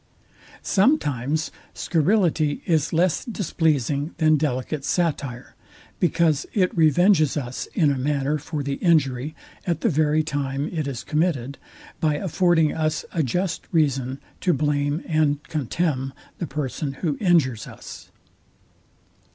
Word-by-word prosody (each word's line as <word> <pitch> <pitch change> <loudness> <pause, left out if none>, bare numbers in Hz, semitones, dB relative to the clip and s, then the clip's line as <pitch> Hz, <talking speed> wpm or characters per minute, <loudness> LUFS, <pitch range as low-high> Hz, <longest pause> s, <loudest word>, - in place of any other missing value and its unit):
Sometimes 155 - +1 0.2
scurrility 165 -3 +1
is 155 -3 +1
less 170 +1 +2
displeasing 155 - -1
than 155 -1 +4
delicate 140 0 -2
satire, 140 -8 -2 0.5
because 165 -4 +2
it 185 -3 +2
revenges 160 0 +4
us 125 -3 -4
in 155 -5 +3
a 135 - -1
manner 145 +2 0
for 150 0 -4
the 140 0 -2
injury 150 -4 +1 0.3
at 170 -2 0
the 230 - +2
very 155 -1 +2
time 140 -1 -2
it 155 -4 -2
is 130 -4 -4
committed, 150 -5 -1 0.4
by 155 -3 +2
affording 175 -1 +2
us 155 -1 -1
a 165 - +1
just 175 +7 -2
reason 135 -5 +1 0.2
to 180 - +2
blame 145 +2 0
and 150 -2 +1
contemn 140 -2 -2 0.3
the 170 - -3
person, 140 0 -3
who 150 -3 +1
injures 155 - +2
us. - - -11
155 Hz, 125 wpm, -23 LUFS, 140-165 Hz, 0.5 s, than